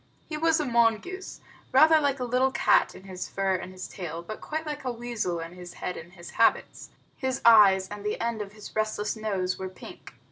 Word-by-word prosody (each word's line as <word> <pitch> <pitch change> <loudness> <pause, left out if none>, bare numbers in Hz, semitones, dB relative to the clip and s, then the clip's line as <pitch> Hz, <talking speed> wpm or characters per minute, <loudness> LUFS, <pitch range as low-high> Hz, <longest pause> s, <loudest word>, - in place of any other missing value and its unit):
He 310 - -5
was 320 +1 +2
a 300 - 0
mongoose, 235 - 0 0.3
rather 310 +4 +6
like 280 -1 0
a - - -2
little 250 +2 +2
cat - - +3
in - - -12
his 185 -1 -6
fur 195 -1 0
and 185 0 -4
his 185 0 -7
tail, 170 -3 -6
but 215 +5 -8
quite 315 +1 -4
like 300 -2 -5
a 255 - -1
weasel 230 -7 -3
in 165 +1 -7
his 180 -1 -10
head 180 - -4
and 170 +2 -10
his 170 -2 -11
habits. 230 - +1 0.3
His 260 -2 -2
eyes 200 -5 +7
and 205 0 -8
the 210 - -2
end 230 -2 -2
of 205 0 -7
his 210 -1 -11
restless 215 0 -1
nose 195 -4 -2
were 190 0 -4
pink. 185 - -12
215 Hz, 215 wpm, -27 LUFS, 185-260 Hz, 0.3 s, eyes